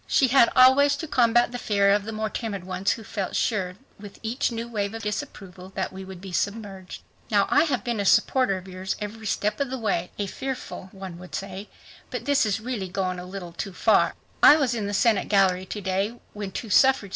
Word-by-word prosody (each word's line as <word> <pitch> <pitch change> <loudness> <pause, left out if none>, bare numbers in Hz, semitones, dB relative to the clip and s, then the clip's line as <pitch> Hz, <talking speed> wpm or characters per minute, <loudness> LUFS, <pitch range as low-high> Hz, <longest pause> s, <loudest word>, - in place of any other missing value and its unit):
She 265 - +3
had 245 -2 +6
always 265 +3 +6
to 320 - -6
combat 240 -4 +3
the 245 - -5
fear 200 -3 +2
of 205 0 +2
the 225 - -4
more 215 0 -2
timid 205 -5 -4
ones 185 +1 0
who 225 - -9
felt 195 -2 -4
sure 185 -5 0 0.2
with 205 -1 -11
each 240 +4 -1
new 230 0 -4
wave 210 -2 -3
of 225 - -6
disapproval 190 -3 -6
that 190 - -2
we 190 0 -7
would 190 -1 -9
be 190 0 -9
submerged. 200 -1 -4 0.3
"Now, - - +3
I - - +5
have 255 -9 -1
been 235 -3 -2
a 200 - -1
supporter 220 0 +3
of 185 +1 -10
yours 185 +1 -4
every 215 +1 -6
step 210 +4 -1
of 280 -2 -1
the 265 - -3
way," 200 -7 -1
a 205 - -1
"fearful" 255 -3 -6
one 190 -3 -9
would 180 0 -8
say, 195 +1 -6 0.4
"but 245 -2 -5
this 285 -4 +3
is 205 +1 0
really 220 -5 -4
going 185 -1 -2
a 180 - -7
little 185 -2 -7
too 195 +3 -5
far. - - +3 0.3
I 295 - +9
was 275 -6 +1
in 215 -4 -2
the 205 - -3
Senate 220 -1 +2
gallery 190 -2 +3
to 210 - -5
day 195 +5 -1
when 205 -2 -5
two 220 +2 -6
suffrage. 265 -5 +4
205 Hz, 225 wpm, -25 LUFS, 190-235 Hz, 0.4 s, I